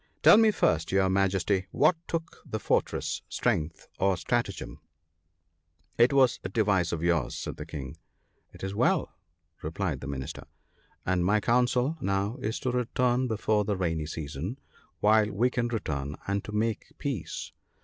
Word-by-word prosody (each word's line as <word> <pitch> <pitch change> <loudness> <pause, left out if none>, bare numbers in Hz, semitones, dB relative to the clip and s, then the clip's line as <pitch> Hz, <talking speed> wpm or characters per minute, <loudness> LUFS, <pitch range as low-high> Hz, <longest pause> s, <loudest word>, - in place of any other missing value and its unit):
"Tell - - +9
me 220 -1 +6
first, 80 - +1
your 95 0 +3
Majesty, 95 0 +1
what 155 +4 +4
took 165 0 -4
the 110 - -4
fortress, - - 0
strength 80 +1 -1
or 95 -1 +2
stratagem? 80 - -2 0.6
" 85 - -43
"It 120 +3 +6
was 135 -3 +4
a 95 - -3
device 100 -5 +2
of 85 -1 -3
yours," 85 -6 +1
said - - -5
the 75 - -7
King. 75 -1 -7 0.5
"It - - -13
is 95 0 -3
well," 140 - +1 0.5
replied 80 -2 -2
the 70 - -6
Minister, 70 +2 -6 0.6
"and 90 -1 +1
my 105 +4 +3
counsel 125 +6 +2
now 100 +4 0
is 110 -3 -3
to 125 - 0
return 125 +1 +1
before 110 -2 +1
the 100 -1 -1
rainy 80 -4 -1
season, 80 - -5 0.4
while 105 0 +5
we 115 +6 +1
can 120 -2 0
return; 75 - -3
and 100 0 0
to - - -6
make 110 +1 -1
peace. 135 - -4
100 Hz, 160 wpm, -28 LUFS, 85-120 Hz, 0.6 s, Tell